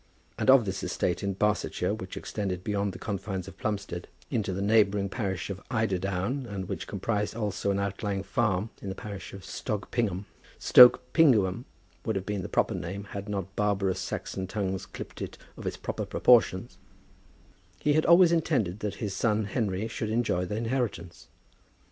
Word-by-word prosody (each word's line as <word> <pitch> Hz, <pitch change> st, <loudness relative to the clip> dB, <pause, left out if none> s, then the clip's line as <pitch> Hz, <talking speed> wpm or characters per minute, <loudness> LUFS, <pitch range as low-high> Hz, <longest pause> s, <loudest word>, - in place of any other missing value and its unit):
And -, -, +1 dB
of 130 Hz, -4 st, +7 dB
this 95 Hz, 0 st, -3 dB
estate 90 Hz, -2 st, -1 dB
in 100 Hz, -1 st, -2 dB
Barsetshire, 105 Hz, +1 st, 0 dB
which -, -, -6 dB
extended 95 Hz, -3 st, -3 dB
beyond 100 Hz, 0 st, 0 dB
the -, -, -9 dB
confines 95 Hz, -2 st, -4 dB
of -, -, -11 dB
Plumstead 100 Hz, -5 st, -3 dB, 0.2 s
into 105 Hz, -4 st, 0 dB
the 95 Hz, -, -3 dB
neighbouring 100 Hz, -2 st, +3 dB
parish 95 Hz, -3 st, -3 dB
of 100 Hz, +1 st, -6 dB
Eiderdown, 105 Hz, +3 st, -1 dB
and 100 Hz, -3 st, -5 dB
which -, -, -4 dB
comprised 105 Hz, -2 st, -2 dB
also 105 Hz, -3 st, -2 dB
an 100 Hz, -, +1 dB
outlying 100 Hz, 0 st, -2 dB
farm 105 Hz, -3 st, 0 dB
in 100 Hz, -, -5 dB
the 95 Hz, -, -4 dB
parish 100 Hz, -3 st, -7 dB
of 95 Hz, -1 st, -10 dB
Stogpingum, 105 Hz, -2 st, -2 dB, 0.3 s
Stoke 125 Hz, -1 st, +7 dB
Pinguium 120 Hz, -, +4 dB, 0.4 s
would 110 Hz, -, -1 dB
have 95 Hz, -1 st, -2 dB
been 105 Hz, -2 st, -2 dB
the -, -, -6 dB
proper -, -, +1 dB
name 100 Hz, +1 st, -4 dB
had 100 Hz, +1 st, -6 dB
not 95 Hz, -1 st, -4 dB
barbarous 100 Hz, -2 st, +1 dB
Saxon 95 Hz, -1 st, -4 dB
tongues 95 Hz, -2 st, -3 dB
clipped -, -, -9 dB
it -, -, -5 dB, 0.2 s
of -, -, -7 dB
its -, -, -3 dB
proper -, -, -4 dB
proportions, -, -, +3 dB, 1.0 s
he 150 Hz, -, +2 dB
had 155 Hz, +1 st, +2 dB
always 170 Hz, +1 st, +7 dB
intended 135 Hz, -, +1 dB
that 105 Hz, -2 st, -3 dB
his 105 Hz, -3 st, -3 dB
son 110 Hz, -1 st, +1 dB
Henry 100 Hz, -1 st, -1 dB
should 110 Hz, -1 st, -4 dB
enjoy 110 Hz, -5 st, +1 dB
the 105 Hz, -, -4 dB
inheritance. 115 Hz, -7 st, -3 dB
100 Hz, 170 wpm, -28 LUFS, 95-110 Hz, 1.0 s, of